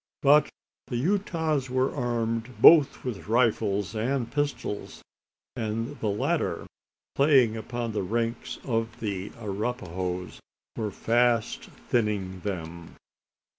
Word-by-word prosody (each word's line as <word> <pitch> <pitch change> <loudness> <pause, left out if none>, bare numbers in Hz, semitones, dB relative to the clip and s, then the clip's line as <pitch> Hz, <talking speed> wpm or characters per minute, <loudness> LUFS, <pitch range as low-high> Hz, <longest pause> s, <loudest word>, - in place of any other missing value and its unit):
But 145 +2 +6 0.4
the 120 - -2
Utahs 160 -4 0
were 130 +1 +1
armed 115 -2 -2
both 150 +2 +7
with 120 -7 -5
rifles 105 -4 +1
and 120 +2 -1
pistols; 145 -7 -3 0.5
and 115 +3 -3
the 110 - -1
latter, 100 +1 -1 0.5
playing 135 -6 +4
upon 115 +1 -4
the 105 - -1
ranks 115 +4 -2
of 115 -2 -2
the 100 -3 -3
Arapahoes, 95 -4 -4 0.4
were 110 -2 -2
fast 115 +2 +1 0.2
thinning 105 -5 0
them. 85 -3 -6
115 Hz, 105 wpm, -27 LUFS, 105-125 Hz, 0.5 s, both